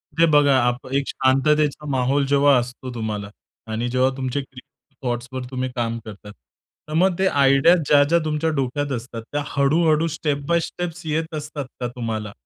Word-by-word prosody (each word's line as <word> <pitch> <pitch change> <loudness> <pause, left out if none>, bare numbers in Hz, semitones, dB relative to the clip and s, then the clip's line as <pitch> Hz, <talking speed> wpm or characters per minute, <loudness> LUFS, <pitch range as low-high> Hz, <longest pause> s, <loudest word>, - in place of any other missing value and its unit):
ते 165 +1 +5
बघा 145 -2 +5
आप 120 +1 -2
एक 140 0 0
शांततेचा 150 +3 +1
माहौल 135 +1 +1
जेव्हा 140 0 +4
असतो 125 +1 -4
तुम्हाला 105 -3 -4 0.4
आणि 115 +2 -2
जेव्हा 130 +1 +2
तुमचे 130 +1 -2
क्रीएटिव 130 -1 -10
थॉट्सवर 120 +2 -4
तुम्ही 130 0 -2
काम 115 -1 -1
करतात. 105 -1 -10 0.6
तर - - -5
मग 180 +2 +2
ते 190 - +3
आयडिया 140 +2 +5
ज्या-ज्या 145 +4 +4
तुमच्या 155 +1 0
डोक्यात 145 -1 -2
असतात, 115 0 -8
त्या 145 0 -1
हळू-हळू 155 +3 +2
स्टेप 145 -3 -2
बाय 170 +1 +3
स्टेप्स 175 -1 -6
येत 160 +1 -2
असतात 150 -1 -5
का 125 - -2
तुम्हाला? 110 -3 -4
140 Hz, 165 wpm, -22 LUFS, 125-150 Hz, 0.6 s, ते